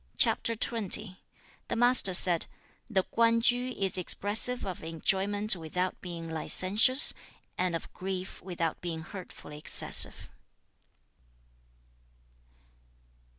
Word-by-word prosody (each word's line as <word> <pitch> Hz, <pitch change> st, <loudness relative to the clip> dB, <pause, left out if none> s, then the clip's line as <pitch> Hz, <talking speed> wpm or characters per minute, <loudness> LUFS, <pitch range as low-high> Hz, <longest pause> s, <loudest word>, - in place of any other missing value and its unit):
The 215 Hz, -3 st, +4 dB, 0.6 s
Master 240 Hz, -5 st, +3 dB
said, 175 Hz, -2 st, +3 dB, 0.4 s
'The 195 Hz, -5 st, +1 dB
Kwan 230 Hz, +2 st, +1 dB
Tsu 245 Hz, +2 st, +1 dB
is 190 Hz, -1 st, -2 dB
expressive 215 Hz, +7 st, 0 dB
of 185 Hz, -3 st, -6 dB
enjoyment 195 Hz, +6 st, -1 dB
without 180 Hz, +2 st, -4 dB
being 170 Hz, -2 st, -7 dB
licentious, 195 Hz, -, +3 dB, 0.4 s
and 180 Hz, -2 st, -2 dB
of 165 Hz, -, -8 dB
grief 190 Hz, 0 st, -6 dB
without 170 Hz, -3 st, -4 dB
being 165 Hz, -2 st, -5 dB
hurtfully 170 Hz, -5 st, -11 dB
excessive.' -, -, -2 dB
190 Hz, 90 wpm, -28 LUFS, 175-220 Hz, 0.6 s, The